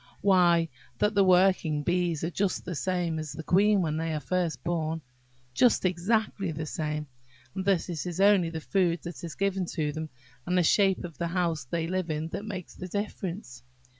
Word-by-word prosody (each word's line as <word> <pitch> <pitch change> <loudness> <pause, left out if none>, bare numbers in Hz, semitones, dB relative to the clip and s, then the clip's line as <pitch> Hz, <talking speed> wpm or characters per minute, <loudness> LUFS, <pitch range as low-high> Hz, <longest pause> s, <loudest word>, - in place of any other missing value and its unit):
"Why, 175 -4 +4 0.3
that 210 - +2
the 200 -1 +4
working 180 -5 +3
bees 175 -2 0
are 165 - -1
just 195 +1 -1
the 180 - -4
same 175 -1 -1
as 155 -2 -5
the 160 - -7
queen 200 +3 +4
when 155 -1 -1
they 160 0 -1
are - - -1
first 165 -5 -2
born, 160 -2 -2 0.5
just 240 - +3
exactly 195 +1 0
the 155 0 -4
same, 150 -1 -3 0.5
and 190 - -3
that 195 -4 +2
it 175 -1 -4
is 175 0 -4
only 195 -4 +5
the 160 -1 -5
food 175 -2 +1
that 170 0 -7
is 170 - -6
given 195 -2 0
them, 155 0 -2 0.4
and 180 +1 +1
the 180 - +4
shape 195 +3 +3
of 170 -6 -8
the 170 - 0
house 170 -5 -1
they 165 +5 -2
live 185 0 -2
in, 155 +1 -2
that 200 - -5
makes 190 -5 -6
the 185 - -7
difference. 190 - -5
175 Hz, 195 wpm, -28 LUFS, 160-190 Hz, 0.5 s, only